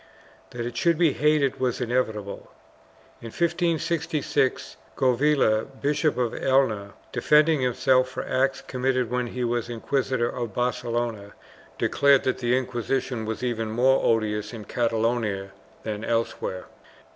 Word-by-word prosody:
1 120 -1 -5
That - - -4
it 120 -1 -7
should 170 +5 +2
be 165 -4 +3
hated 150 -3 +2
was 125 -2 0
inevitable. 110 -5 -2 0.7
In 115 - -7
1566, 160 -2 0 0.2
Govilla, 130 -4 +2
Bishop 150 +1 +1
of 120 -2 0
Elna, 110 -7 +1 0.2
defending 150 -1 +3
himself 130 +1 +2
for - - -5
acts 135 +1 0
committed 130 -2 -1
when 125 0 0
he 125 +1 -4
was 120 -1 -1
inquisitor 125 +1 -1
of 120 -3 -5
Barcelona, 120 -4 -2 0.4
declared 140 -1 +3
that 130 - -1
the 125 0 +2
Inquisition 125 -1 -2
was 110 +2 -4
even 115 -3 -1
more 130 +4 +3
odious 105 -1 0
in 110 -3 -8
Catalonia 115 -4 -1 0.3
than 105 -1 -4
elsewhere. 115 -5 -2
125 Hz, 130 wpm, -25 LUFS, 115-135 Hz, 0.7 s, be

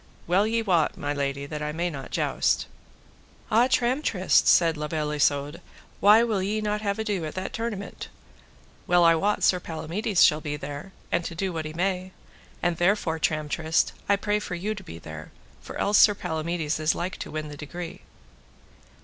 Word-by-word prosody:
well 190 +5 +3
ye 225 +1 0
wot, 175 -7 +2
my 145 0 -2
lady, 140 -1 -2
that 150 +1 -6
I 150 0 -2
may 170 +3 -2
not 135 -3 -7
joust. - - 0 0.9
Ah, 235 +3 +5
Tramtrist, 245 - +2
said 165 -2 +5
La 150 0 -4
Beale 150 -1 -2
Isoud, 145 +1 0 0.4
why 210 +3 +7
will 215 -5 0
ye 205 +3 -1
not 210 0 -1
have 200 -2 -1
ado 210 -5 -2
at 155 - -5
that 185 0 -4
tournament? 225 -3 -5 0.8
well 175 -1 +5
I 165 0 +7
wot 200 +6 0
Sir 180 - +4
Palamides 175 +5 0
shall 150 0 +5
be 150 -1 -3
there, 145 +6 -7 0.2
and 170 - +1
to 170 - -5
do 185 +1 -2
what 160 -1 -3
he 155 - -6
may; 185 +1 -2 0.5
and 175 -2 +1
therefore 175 -3 +1
Tramtrist, 155 +1 0 0.2
I 200 - +6
pray 205 +1 0
you - - -2
for 180 -4 -4
to 205 +2 -4
be 85 - -9
there, 80 -1 -9 0.3
for - - -8
else 205 0 +3
Sir 205 - +7
Palamides 160 -2 -2
is 155 0 +1
like 180 +2 -3
to - - -6
win 155 -1 -4
the 145 - -8
degree. 165 +4 -7
175 Hz, 185 wpm, -26 LUFS, 155-200 Hz, 0.9 s, why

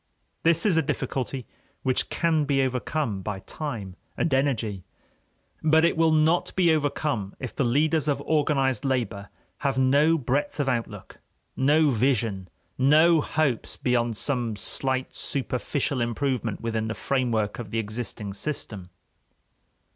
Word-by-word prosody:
This 165 +2 +3
is 185 -6 +3
a - - +5
difficulty 130 -2 -3 0.4
which 130 -1 +1
can 160 -3 +1
be 135 -1 +2
overcome 125 -4 -2
by 95 0 -4
time 110 - -6 0.2
and 165 - 0
energy. 115 -8 0 0.8
But 160 +1 +4
it 170 - +2
will 165 0 +3
not 155 +2 +2
be 175 -3 +4
overcome 145 -8 -1
if 130 - -6
the - - +1
leaders 150 +5 +2
of 140 -2 +1
organized 140 -3 +1
labor 115 -7 -2 0.3
have 140 -2 -1
no 140 +5 +4
breadth 145 +2 -1
of 145 - 0
outlook, 120 -3 -3 0.4
no 150 +2 +4
vision, 115 -6 0 0.3
no 155 +4 +5
hopes 145 -6 -1
beyond 120 -3 0
some 120 -5 -1
slight 130 +5 -2
superficial 130 0 -2
improvement 120 -2 -1
within 115 -1 -2
the 110 - -3
framework 115 -6 -1
of 115 -4 -6
the 115 - -3
existing 110 -1 -4
system. 105 -6 -4
130 Hz, 135 wpm, -26 LUFS, 115-150 Hz, 0.8 s, a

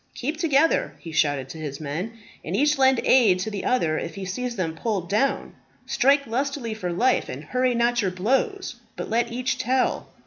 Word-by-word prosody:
"Keep 295 +5 -3
together," 320 -1 +2
he 165 - -9
shouted 145 -4 +1
to 160 - -8
his 145 -3 -5
men, 160 +9 -4 0.3
"and 170 - -3
each 295 +4 +2
lend 265 -2 +5
aid 225 -8 +5
to 190 +4 -3
the 200 -2 -4
other 165 -11 +1
if 170 - -6
he 195 -1 -5
sees 240 +6 -4
him 165 -4 -1
pulled 190 0 -2
down. 225 +7 0 0.3
Strike 280 +2 +3
lustily 255 0 -2
for 185 -5 -4
life, 245 +9 +1
and 135 +4 -6
hurry 250 +7 0
not 240 0 +2
your 195 - +1
blows, 255 - -1 0.2
but - - -6
let 235 +1 +1
each 250 +2 -2
tell." 255 +2 0
230 Hz, 195 wpm, -24 LUFS, 180-260 Hz, 0.3 s, lend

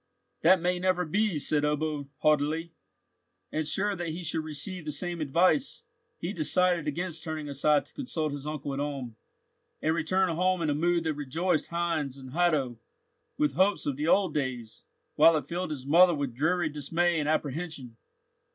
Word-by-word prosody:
"That 185 - +6
may 180 +1 0
never 180 -1 +1
be," 200 +2 +1
said 150 +1 +1
Ebbo, 150 -1 -1
haughtily. 155 +2 +1 0.8
And, 155 -1 -2
sure 200 +5 0
that 175 -1 -4
he 165 +3 -5
should 160 -1 -1
receive 160 +4 -4
the 150 - -4
same 170 +3 -3
advice, 175 - +2 0.3
he 175 +4 -4
decided 175 0 +2
against 165 +2 -3
turning 155 -3 -4
aside 145 +1 +2
to - - -15
consult 160 - -3
his 145 0 -6
uncle 145 -2 -4
at 135 - -3
Ulm, 140 -5 -4 0.6
and 160 - +1
returned 180 +3 +1
home 180 +1 +1
in 155 - +1
a - - +2
mood 170 +3 +1
that 160 -1 0
rejoiced 155 +4 -1
Heinz 165 -5 -2
and 130 -1 -10
Hatto 150 -8 +1 0.6
with 150 -2 +1
hopes 190 +6 +2
of 145 - -1
the 150 +3 -2
old 185 -2 +3
days, 130 -6 -4 0.3
while 165 -1 +7
it 145 - -4
filled 175 +3 -3
his 140 -4 -5
mother 170 +4 +6
with 140 -4 -3
dreary 155 +5 +1
dismay 165 +3 0
and 150 0 -1
apprehension. 150 -5 -3
155 Hz, 175 wpm, -28 LUFS, 145-175 Hz, 0.8 s, while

